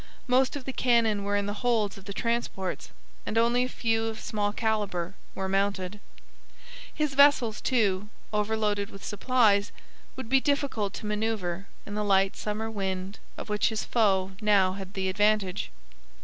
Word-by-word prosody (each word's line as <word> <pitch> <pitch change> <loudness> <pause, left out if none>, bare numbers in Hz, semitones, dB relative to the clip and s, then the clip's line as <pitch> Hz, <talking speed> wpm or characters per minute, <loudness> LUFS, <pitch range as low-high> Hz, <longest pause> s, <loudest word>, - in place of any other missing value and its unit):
Most 260 +1 +3
of 275 -3 -6
the 265 - -4
cannon 230 -5 +2
were 205 0 0
in 205 0 +1
the 205 - -2
holds 225 -5 +1
of 195 -2 -13
the 200 - -6
transports, 230 -4 -2 0.3
and 220 - -3
only 235 +2 +3
a 255 - -2
few 225 -2 0
of 220 -1 -4
small 210 -2 -1
calibre 205 -5 -1 0.2
were 190 - -2
mounted. 195 0 -1 0.9
His 300 -3 -1
vessels, 275 -6 +4
too, 210 -5 +1 0.2
overloaded 210 -1 0
with 195 - -10
supplies, 205 -2 +2 0.4
would 260 -3 -6
be 265 +3 +4
difficult 275 -9 0
to - - -7
manoeuvre 210 -4 -2 0.2
in 205 - -7
the 210 0 -1
light 195 -1 +3
summer 215 +1 -3
wind 190 -1 -3 0.2
of - - -6
which 210 -1 +1
his 220 -1 -3
foe 195 -5 +2
now 200 -3 +4
had 195 0 -8
the 190 -1 -1
advantage. 205 - +1
210 Hz, 165 wpm, -28 LUFS, 195-230 Hz, 0.9 s, vessels